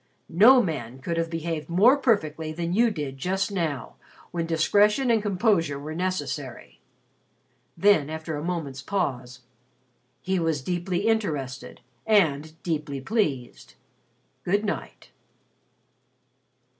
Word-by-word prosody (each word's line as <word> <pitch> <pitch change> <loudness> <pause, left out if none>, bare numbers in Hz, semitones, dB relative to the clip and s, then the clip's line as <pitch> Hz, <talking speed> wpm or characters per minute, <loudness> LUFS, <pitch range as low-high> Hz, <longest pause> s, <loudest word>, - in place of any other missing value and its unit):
"No 240 +9 +7
man 130 -8 -4
could 165 +5 -4
have 165 0 -1
behaved 165 -1 -4
more 205 +10 +5
perfectly 160 - 0
than 170 +2 -3
you 230 +4 +4
did 145 -9 -5
just 190 +6 -1
now, 160 -9 -3 0.3
when 170 -1 -2
discretion 205 +9 +3
and 225 -2 +3
composure 190 -7 +1
were 150 +3 -6
necessary." 185 +2 -4 1.0
Then, 195 -8 +4
after 160 0 -5
a 145 - -5
moment's 160 -6 -4
pause, 130 -8 -3 0.8
"He 190 0 -1
was 160 -5 -1
deeply 180 +3 -2
interested 145 - -2 0.3
and 160 -8 +2
deeply 150 -4 -3
pleased. 135 - -2 0.7
Good 205 +4 +1
night." 205 - -5
165 Hz, 115 wpm, -25 LUFS, 150-200 Hz, 1.0 s, No